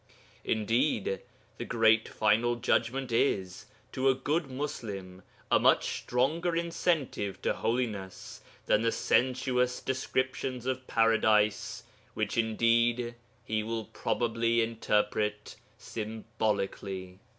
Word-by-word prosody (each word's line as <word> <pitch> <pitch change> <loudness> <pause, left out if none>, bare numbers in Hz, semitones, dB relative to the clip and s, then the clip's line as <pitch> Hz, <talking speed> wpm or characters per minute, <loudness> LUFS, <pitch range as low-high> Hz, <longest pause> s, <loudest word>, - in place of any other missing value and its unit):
Indeed, 110 -1 +1 0.4
the - - -2
great 115 -1 +3
final 115 +3 +2
Judgment 125 +2 0
is, 95 -6 0 0.2
to 135 +1 +2
a 130 - +4
good 145 +3 -1
Muslim, 100 -9 -5 0.3
a - - +6
much - - +3
stronger 160 +8 0
incentive 165 - -1
to - - +2
holiness 110 -6 -3 0.2
than 105 - +3
the 115 0 +2
sensuous 125 0 +1
descriptions 130 -1 -2
of 130 0 -3
Paradise, 110 -2 +2 0.3
which - - -1
indeed 115 +1 +2 0.3
he 110 0 0
will 110 0 -3
probably 115 +1 0
interpret 105 -2 -1 0.2
symbolically. 105 -4 -3
115 Hz, 100 wpm, -30 LUFS, 105-130 Hz, 0.4 s, a